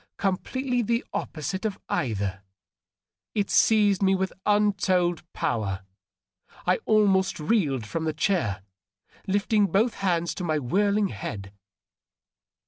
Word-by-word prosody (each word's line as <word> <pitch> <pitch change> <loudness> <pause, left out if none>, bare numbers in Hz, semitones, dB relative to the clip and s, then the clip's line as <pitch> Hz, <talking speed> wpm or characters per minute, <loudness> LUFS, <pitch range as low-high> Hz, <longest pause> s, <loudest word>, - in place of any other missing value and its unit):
Completely 245 +6 -1
the 235 +1 0
opposite 175 +5 -3
of 215 -3 -2
either, 100 -5 -2 0.9
it 205 -2 0
seized 205 -3 +4
me 195 0 +4
with 190 0 -2
untold 190 -4 +2
power. 100 -4 -2 0.8
I - - +3
almost 195 -4 +3
reeled 150 - +1
from 160 +8 -3
the 160 - +1
chair, 150 - 0 0.6
lifting 205 +1 +2
both 215 +5 +2
hands 170 -3 0
to 180 - -6
my 155 -3 0
whirling 200 - +1
head. 100 -1 -6
190 Hz, 115 wpm, -26 LUFS, 150-205 Hz, 0.9 s, seized